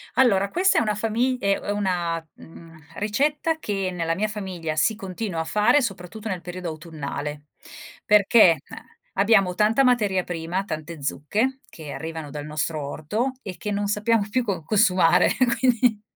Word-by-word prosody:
Allora, 200 Hz, -6 st, +3 dB
questa 375 Hz, -, +2 dB
è -, -, +2 dB
una 210 Hz, -2 st, 0 dB
fami 235 Hz, +4 st, 0 dB
ehm, 200 Hz, -3 st, +1 dB
è 205 Hz, -, -2 dB
una, 175 Hz, -5 st, -1 dB
mhmm, 165 Hz, 0 st, -14 dB, 0.2 s
ricetta 295 Hz, +9 st, 0 dB
che 195 Hz, -6 st, -2 dB
nella 165 Hz, -2 st, -1 dB
mia 210 Hz, +5 st, 0 dB
famiglia 185 Hz, -7 st, -5 dB
si 205 Hz, +8 st, +2 dB
continua 190 Hz, -3 st, -4 dB
a -, -, -1 dB
fare, 210 Hz, -, +3 dB
soprattutto 210 Hz, 0 st, -5 dB
nel 185 Hz, -3 st, -3 dB
periodo 180 Hz, 0 st, -6 dB
autunnale, 150 Hz, -2 st, -6 dB, 0.6 s
perché, 210 Hz, -1 st, +6 dB
eh, 155 Hz, -, -10 dB, 0.5 s
abbiamo 195 Hz, -2 st, +3 dB
tanta 220 Hz, +6 st, +3 dB
materia 210 Hz, -7 st, +2 dB
prima, 175 Hz, +2 st, -3 dB
tante 155 Hz, -3 st, -6 dB
zucche, 215 Hz, -, -1 dB
che 155 Hz, -3 st, -9 dB
arrivano 160 Hz, -2 st, -6 dB
dal 145 Hz, +1 st, -6 dB
nostro 155 Hz, 0 st, -2 dB
orto 215 Hz, -, -2 dB
e 190 Hz, -6 st, -7 dB
che 210 Hz, -, -4 dB
non 205 Hz, 0 st, -1 dB
sappiamo 210 Hz, +1 st, +1 dB
più 250 Hz, +4 st, +1 dB
con 190 Hz, -7 st, -3 dB
consumare 185 Hz, -2 st, +4 dB, 0.3 s
quindi. 240 Hz, -4 st, +2 dB
195 Hz, 160 wpm, -24 LUFS, 165-220 Hz, 0.6 s, perché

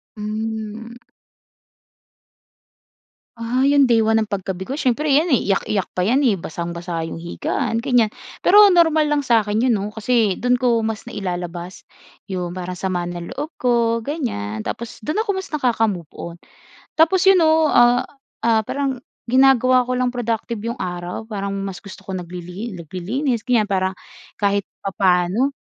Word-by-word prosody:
Hmm. 220 Hz, +1 st, -5 dB, 2.5 s
Ah, 245 Hz, +3 st, 0 dB
yung 280 Hz, -1 st, +5 dB
day 225 Hz, -2 st, +4 dB
1 225 Hz, 0 st, +3 dB
ng 215 Hz, -, -1 dB
pagkabigo? 190 Hz, +4 st, -4 dB
Siyempre 290 Hz, +1 st, 0 dB
'yan 305 Hz, +3 st, +3 dB
eh, 255 Hz, -, +5 dB
iyak-iyak 195 Hz, 0 st, -1 dB
pa 180 Hz, -, +1 dB
'yan 245 Hz, +8 st, +3 dB
eh. 210 Hz, -, +3 dB
Basang-basa 170 Hz, 0 st, -5 dB
yung -, -, -6 dB
higaan, 225 Hz, +7 st, -2 dB
ganiyan. 235 Hz, -4 st, +2 dB, 0.3 s
Pero 415 Hz, 0 st, +8 dB
normal 320 Hz, -4 st, +4 dB
lang 295 Hz, -1 st, +1 dB
sa 235 Hz, -3 st, +4 dB
akin 210 Hz, +2 st, -1 dB
'yon 255 Hz, -, +3 dB
'no, 205 Hz, -2 st, 0 dB
kasi 220 Hz, -2 st, +1 dB
do'n 245 Hz, 0 st, +1 dB
ko 235 Hz, -3 st, +2 dB
mas 220 Hz, +1 st, -4 dB
nailalabas 180 Hz, -4 st, -5 dB, 0.4 s
yung 180 Hz, -2 st, -3 dB
parang 180 Hz, 0 st, -5 dB
sama 180 Hz, -1 st, -2 dB
ng 175 Hz, -1 st, -6 dB
loob 290 Hz, +3 st, -4 dB
ko, 230 Hz, -2 st, +1 dB
ganiyan. 220 Hz, -, -3 dB
Tapos 235 Hz, 0 st, -6 dB
do'n 320 Hz, -, -1 dB
ako 455 Hz, -, -15 dB
mas 380 Hz, -, -7 dB
nakaka-move-on. 220 Hz, -, -2 dB, 0.6 s
Tapos 340 Hz, +3 st, +4 dB
'yon 385 Hz, -2 st, +6 dB
‘no, 315 Hz, -1 st, +4 dB
ah, 240 Hz, 0 st, +5 dB, 0.4 s
ah, 225 Hz, -1 st, +3 dB
parang 275 Hz, -2 st, -2 dB, 0.3 s
ginagawa 255 Hz, -1 st, +5 dB
ko 255 Hz, -, -1 dB
lang 250 Hz, 0 st, 0 dB
productive 235 Hz, -2 st, -3 dB
yung 235 Hz, +2 st, -4 dB
araw, 180 Hz, +2 st, -4 dB
parang 200 Hz, -2 st, -4 dB
mas 195 Hz, -2 st, -5 dB
gusto 200 Hz, -2 st, -12 dB
ko -, -, -8 dB
naglili 180 Hz, +4 st, -7 dB
naglilinis, 210 Hz, -, -3 dB
ganiyan, 230 Hz, -4 st, +3 dB
para 190 Hz, -1 st, 0 dB, 0.4 s
kahit 200 Hz, -1 st, +1 dB, 0.2 s
papaano. 195 Hz, +6 st, +1 dB
225 Hz, 150 wpm, -21 LUFS, 190-255 Hz, 2.5 s, Pero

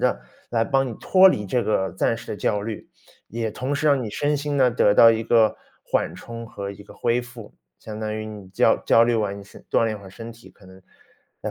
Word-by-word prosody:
地 -, -, +1 dB, 0.3 s
来 115 Hz, -1 st, +1 dB
帮 135 Hz, +2 st, +1 dB
你 115 Hz, -, -6 dB
脱 190 Hz, 0 st, +6 dB
离 105 Hz, -, -1 dB
这 120 Hz, +5 st, 0 dB
个 95 Hz, -4 st, 0 dB
暂 105 Hz, +5 st, 0 dB
时 115 Hz, -, -12 dB
的 -, -, -5 dB
焦 105 Hz, 0 st, 0 dB
虑， 110 Hz, 0 st, -7 dB, 0.4 s
也 115 Hz, 0 st, -3 dB
同 130 Hz, +6 st, -3 dB
时 150 Hz, +2 st, -1 dB
让 140 Hz, -3 st, +3 dB
你 105 Hz, -, -5 dB
身 145 Hz, +6 st, 0 dB
心 145 Hz, 0 st, -3 dB
呢， 130 Hz, -2 st, +4 dB
得 105 Hz, -4 st, +3 dB
到 115 Hz, -, +8 dB
一 115 Hz, 0 st, -1 dB
个 110 Hz, -2 st, +3 dB, 0.3 s
缓 -, -, -1 dB
冲 115 Hz, 0 st, -9 dB
和 100 Hz, -3 st, -6 dB
一 100 Hz, 0 st, -11 dB
个 -, -, -15 dB
恢 120 Hz, +1 st, 0 dB
复。 120 Hz, -3 st, -12 dB, 0.3 s
相 110 Hz, -1 st, -8 dB
当 110 Hz, -1 st, -3 dB
于 110 Hz, 0 st, -5 dB
你 105 Hz, -3 st, -9 dB
焦 95 Hz, -, +3 dB
焦 115 Hz, -, +5 dB
虑 120 Hz, 0 st, +1 dB
完 105 Hz, -3 st, -1 dB
你 -, -, -10 dB
身 100 Hz, -, -16 dB
锻 -, -, +3 dB
炼 110 Hz, -1 st, -1 dB
一 -, -, -13 dB
会 100 Hz, -, -13 dB
儿 -, -, -12 dB
身 115 Hz, +4 st, -9 dB
体， 115 Hz, +1 st, -17 dB
可 95 Hz, -, -20 dB
能， 95 Hz, 0 st, -15 dB, 0.6 s
再 -, -, -3 dB
115 Hz, 270 characters per minute, -23 LUFS, 105-120 Hz, 0.6 s, 到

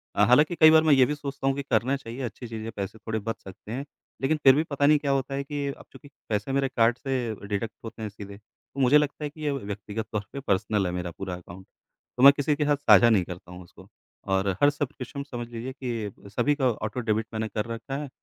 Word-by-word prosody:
अ, 105 Hz, -, +5 dB
हालाँकि 150 Hz, -, +4 dB
कई 155 Hz, -1 st, +8 dB
बार 160 Hz, 0 st, +6 dB
मैं 155 Hz, -2 st, +5 dB
ये 135 Hz, -2 st, +6 dB
भी 150 Hz, -, -2 dB
सोचता 140 Hz, -2 st, -4 dB
हूँ 135 Hz, -, +2 dB
कि 140 Hz, -, -3 dB
करना 120 Hz, +4 st, +2 dB
चाहिए, 125 Hz, -1 st, -8 dB
अच्छी 120 Hz, +1 st, -6 dB
चीज़ 110 Hz, -1 st, -6 dB
है, 115 Hz, -, -5 dB
पैसे 100 Hz, 0 st, -5 dB
थोड़े 110 Hz, 0 st, -3 dB
बच 115 Hz, +2 st, -3 dB
सकते 95 Hz, +2 st, -11 dB
हैं, 135 Hz, +4 st, -4 dB, 0.4 s
लेकिन 155 Hz, +4 st, +2 dB
फिर 135 Hz, -1 st, +8 dB
भी 155 Hz, -, +2 dB
पता 145 Hz, -3 st, 0 dB
नहीं 150 Hz, 0 st, +5 dB
क्या 140 Hz, -1 st, -1 dB
होता 135 Hz, 0 st, -1 dB
है 140 Hz, -, -2 dB
कि 145 Hz, 0 st, -3 dB
अब 140 Hz, -, -8 dB
चूँकि 145 Hz, -, -13 dB, 0.2 s
पैसे 105 Hz, +4 st, -1 dB
मेरे 135 Hz, 0 st, +1 dB
कार्ड 120 Hz, -1 st, +2 dB
से 125 Hz, -5 st, -2 dB
डिडक्ट 105 Hz, +2 st, -3 dB
होते 115 Hz, 0 st, -8 dB
हैं 110 Hz, -, -3 dB
सीधे, 100 Hz, -1 st, -10 dB
तो 110 Hz, +5 st, -15 dB
मुझे 130 Hz, +3 st, +6 dB
लगता 150 Hz, 0 st, -1 dB
है 150 Hz, -, -2 dB
कि 155 Hz, +2 st, -14 dB
ये 150 Hz, -1 st, 0 dB
व्यक्तिगत 105 Hz, -3 st, -5 dB
तौर 105 Hz, -1 st, -2 dB
पे 140 Hz, -, -4 dB
पर्सनल 105 Hz, -4 st, 0 dB
है -, -, -2 dB
मेरा 90 Hz, -1 st, -3 dB
पूरा 95 Hz, -2 st, -4 dB
अकाउंट। 90 Hz, +1 st, -12 dB, 0.5 s
तो 125 Hz, -, +1 dB
मैं 140 Hz, +1 st, +11 dB
किसी 145 Hz, +1 st, 0 dB
के 150 Hz, 0 st, 0 dB
साथ 145 Hz, 0 st, +2 dB
साझा 120 Hz, -4 st, +6 dB
नहीं 105 Hz, -5 st, +4 dB
करता 90 Hz, 0 st, -9 dB
हूँ 90 Hz, 0 st, -9 dB
उसको। 85 Hz, -, -17 dB, 0.4 s
और 95 Hz, +1 st, +1 dB
हर 145 Hz, -, +8 dB
सब्सक्रिप्शन 145 Hz, 0 st, -5 dB
समझ 120 Hz, -4 st, -6 dB
लीजिए 120 Hz, +2 st, -6 dB
कि, 115 Hz, -6 st, -6 dB
सभी 145 Hz, +9 st, +1 dB
का 135 Hz, -3 st, +1 dB
ऑटो 110 Hz, +2 st, -4 dB
डेबिट 110 Hz, -1 st, 0 dB
मैंने 110 Hz, 0 st, -2 dB
कर 105 Hz, 0 st, -3 dB
रखा 115 Hz, +3 st, -5 dB
है, 145 Hz, -, -6 dB
120 Hz, 255 wpm, -26 LUFS, 105-140 Hz, 0.5 s, मैं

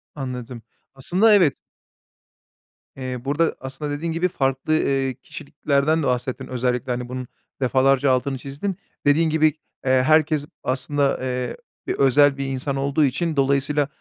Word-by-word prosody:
Anladım, 125 Hz, -4 st, -6 dB, 0.3 s
aslında 185 Hz, +11 st, +3 dB
evet. 175 Hz, -9 st, +5 dB, 1.4 s
Eee, 130 Hz, -1 st, -5 dB
burada 145 Hz, +4 st, +1 dB
aslında 135 Hz, +3 st, -5 dB
dediğin 160 Hz, +3 st, -3 dB
gibi 170 Hz, +3 st, +1 dB
farklı, 135 Hz, -2 st, -1 dB
eee, 135 Hz, -3 st, +1 dB
kişiliklerden 145 Hz, +2 st, -1 dB
de -, -, 0 dB
bahsettin 125 Hz, +1 st, -2 dB
özellikle, 125 Hz, 0 st, -1 dB
hani, 120 Hz, 0 st, -3 dB
bunun 125 Hz, 0 st, -5 dB, 0.3 s
defalarca 135 Hz, +1 st, +3 dB
altını 130 Hz, +1 st, 0 dB
çizdin. 140 Hz, +9 st, -4 dB, 0.3 s
Dediğin 155 Hz, +3 st, +4 dB
gibi, 155 Hz, 0 st, +4 dB, 0.4 s
eee, 130 Hz, -1 st, +3 dB
herkes 155 Hz, 0 st, +3 dB, 0.2 s
aslında, 135 Hz, +2 st, 0 dB
eee, 125 Hz, -1 st, -3 dB, 0.3 s
bir -, -, -1 dB
özel 140 Hz, +1 st, +4 dB
bir 140 Hz, -, -3 dB
insan 135 Hz, +1 st, -2 dB
olduğu 140 Hz, +2 st, +1 dB
için 155 Hz, +5 st, -1 dB
dolayısıyla 140 Hz, +1 st, +1 dB
135 Hz, 135 wpm, -22 LUFS, 130-150 Hz, 1.4 s, evet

